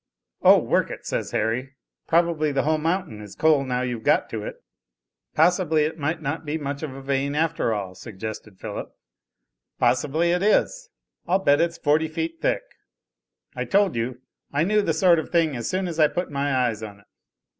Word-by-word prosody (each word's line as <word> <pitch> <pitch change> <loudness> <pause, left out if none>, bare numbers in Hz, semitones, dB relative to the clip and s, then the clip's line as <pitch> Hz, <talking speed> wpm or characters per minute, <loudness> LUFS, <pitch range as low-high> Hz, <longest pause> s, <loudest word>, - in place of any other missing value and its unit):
"Oh, - - +8
work - - +1
it," - - -8
says - - -2
Harry, 130 +5 -2 0.3
"probably 165 -2 +2
the 135 -1 0
whole 155 +1 +1
mountain 165 - -2
is 105 -2 -10
coal 155 -3 +3
now 125 -1 -1
you've 120 -3 -3
got - - +2
to - - -3
it." - - -8 0.7
"Possibly 160 -1 +3
it 160 +2 -3
might 160 +2 -2
not 145 +4 -3
be 155 +1 -2
much 140 -2 -4
of 145 -4 -5
a 135 - -9
vein 140 +1 -1
after 160 -5 0
all," 100 -4 -3
suggested 105 0 -8
Philip. - - -7 0.8
"Possibly 150 +7 +2
it 180 +1 +1
is; 470 - +1 0.4
I'll 180 - +3
bet 145 -7 +3
it's 170 0 0
forty 155 +2 +2
feet 325 - -4
thick. - - +1 0.9
I - - -2
told 200 - +2
you. 120 +2 -3 0.3
I 145 +2 +1
knew 210 +4 +3
the 165 -6 0
sort 170 0 +5
of - - -5
thing 165 -5 +2
as 120 - -3
soon 185 0 -1
as 165 -2 -5
I 155 - +7
put 175 +1 -3
my 140 0 -1
eyes 125 -4 0
on 100 -2 -9
it." - - -28
150 Hz, 190 wpm, -24 LUFS, 130-170 Hz, 0.9 s, Oh